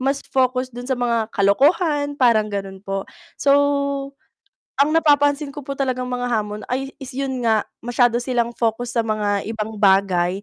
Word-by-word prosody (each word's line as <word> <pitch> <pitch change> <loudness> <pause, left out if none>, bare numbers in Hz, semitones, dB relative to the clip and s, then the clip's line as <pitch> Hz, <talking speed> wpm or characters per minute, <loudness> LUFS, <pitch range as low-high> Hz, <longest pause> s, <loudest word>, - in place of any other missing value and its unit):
mas 275 +2 -1
focus 255 -1 +1
do'n 245 +1 -8
sa 260 - 0
mga 235 -2 0
kalokohan, 285 - +2
parang 225 -4 +3
gano'n 195 -1 -5
po. 195 -1 -3 0.3
So, 280 - +2 1.2
ang 285 +2 +3
napapansin 290 -2 +2
ko 290 - -7
po 275 +1 -6
talagang 255 -2 -1
mga 245 0 -2
hamon 210 -3 -2
ay 270 +2 -3
is 270 -2 -9
'yun 265 -1 -2
nga 220 -2 +3 0.2
masyado 240 0 +1
silang 240 -1 -1
focus 235 +1 -1
sa 230 - +1
mga 205 -2 -1
ibang 220 -1 -5
bagay, 190 -1 +2
245 Hz, 160 wpm, -21 LUFS, 210-270 Hz, 1.2 s, parang